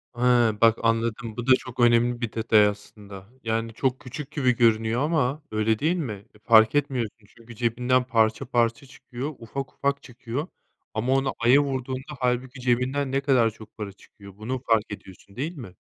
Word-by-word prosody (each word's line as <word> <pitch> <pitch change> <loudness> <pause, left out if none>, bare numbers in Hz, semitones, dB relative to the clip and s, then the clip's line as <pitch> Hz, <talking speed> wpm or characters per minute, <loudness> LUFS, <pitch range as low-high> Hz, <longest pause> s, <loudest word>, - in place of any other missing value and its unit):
He! 120 - -7 0.4
Bak, 115 -1 +5
anladım, 115 0 -1
bu 120 - -5
da 130 - +7
çok 130 -1 -9
önemli 120 0 +3
bir 120 -3 -2
detay 110 -2 +4
aslında, 100 -1 -8
yani, 115 0 -2
çok 130 +2 -1
küçük 140 +2 -8
gibi 130 -5 +1
görünüyor 115 0 +2
ama 150 -2 0
öyle 110 0 +1
değil 160 +4 +1
mi? 110 - -5
E, - - -19
fark 110 +2 +5
etmiyorsun 125 -7 -2
çünkü 115 0 -13
cebinden 125 +2 +1
parça 110 -3 +1
parça 120 +2 0
çıkıyor. 135 +2 -7
Ufak 130 +4 -6
ufak 140 0 -1
çıkıyor 125 +4 -5 0.5
ama 120 +4 0
onu 135 0 +1
aya 120 +4 +5
vurduğunda 130 +1 -4
hâlbuki 125 +1 -1
cebinden 130 +3 0
ne 135 - 0
kadar 130 -5 +3
çok 110 0 -15
para 105 -2 -5
çıkıyor, 100 0 -16
bunu 125 +5 -4
fark 110 -2 +2
ediyorsun, 100 0 -11
değil 155 +7 -4
mi? 100 -9 -10
120 Hz, 175 wpm, -25 LUFS, 110-130 Hz, 0.5 s, da